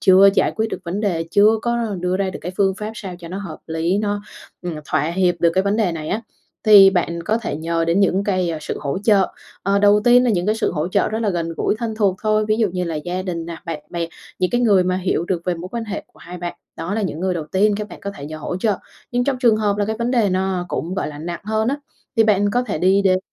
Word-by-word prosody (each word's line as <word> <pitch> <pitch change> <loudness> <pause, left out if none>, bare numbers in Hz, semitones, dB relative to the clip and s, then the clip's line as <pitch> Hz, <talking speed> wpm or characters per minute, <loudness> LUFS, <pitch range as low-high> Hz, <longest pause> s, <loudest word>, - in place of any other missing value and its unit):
chưa 190 +1 +7
giải - - +2
quyết 220 0 +1
được - - -3
vấn 180 +5 -3
đề, 175 -6 0
chưa 215 +3 +5
có 235 0 0 0.2
đưa 180 +1 0
ra 195 -1 -1
được - - -7
cái 180 - -4
phương 195 -1 +2
pháp 215 +1 -4
sao 190 -4 -7
cho 170 -1 -9
nó 185 +3 -5
hợp 195 -6 -7
lý 165 +4 0
nó, 205 -1 -1 0.4
ừm, 175 -2 -4
thỏa - - +1
hiệp 175 +3 +1
được 170 - +4
cái 190 - +3
vấn 200 +1 +1
đề 210 -6 +1
này 155 -2 -5
á, 210 - -1 0.4
thì 200 -3 +9
bạn 170 -2 -1
có 220 +4 +1
thể 230 - -4
nhờ 165 +1 -1
đến 170 +4 +2
những 195 0 +2
cái, 185 -4 0
a, 160 - -3
sự - - -4
hỗ 140 +5 -2
trợ. 200 -4 +4 0.3
Ờ, 200 +1 +2
đầu 205 +1 +5
tiên 245 +1 +6
là 245 - +3
những 180 -3 0
cái 215 - +2
sự 220 - -1
hỗ 155 +1 -1
trợ 200 +2 +1
rất 220 - -2
là 210 - +1
gần 170 -2 -2
gũi - - +1
thân 225 -1 -3
thuộc 200 -4 +2
thôi, 215 0 +2
ví 215 - +3
dụ 220 -2 +2
như 180 0 -2
là 165 - -3
gia 175 +4 -3
đình 170 -3 -4
nè, 170 -1 -6
bạn 165 -3 -4
bè, 170 -1 -2 0.3
những 185 -1 +1
cái 240 - +1
người 200 -6 +4
mà 185 0 +1
hiểu 180 -2 0
được 175 -2 -2
về 180 - 0
mối 170 +2 -7
quan 230 -1 -3
hệ 205 -2 -5
của - - -25
hai 180 +1 -9
bạn, 175 0 -4 0.2
đó 180 +5 -3
là 220 - -1
những 170 -5 -3
người 185 0 0
đầu 160 - -3
tiên 205 +2 +3
các 210 0 -4
bạn - - -11
có 200 - -4
thể 140 - -8
nhờ 155 +1 -7
hỗ 155 - -4
trợ. 205 +1 +1 0.3
Nhưng 245 0 +1
trong 275 -2 0
trường 235 -4 +4
hợp 210 -2 +1
là 205 - +2
cái 220 +1 -2
vấn 235 +2 -1
đề 235 -5 +3
nó 185 -1 0
cũng, 170 +2 -3
gọi 190 - -2
là, 145 -1 -9
nặng 170 +2 -5
hơn 220 +1 0
á, 275 - 0 0.4
thì 225 - +5
bạn 205 -1 +3
có 245 +3 +1
thể 210 -10 -3
đi 190 +4 +3
đến 185 -1 +3
190 Hz, 290 wpm, -20 LUFS, 175-210 Hz, 0.4 s, thì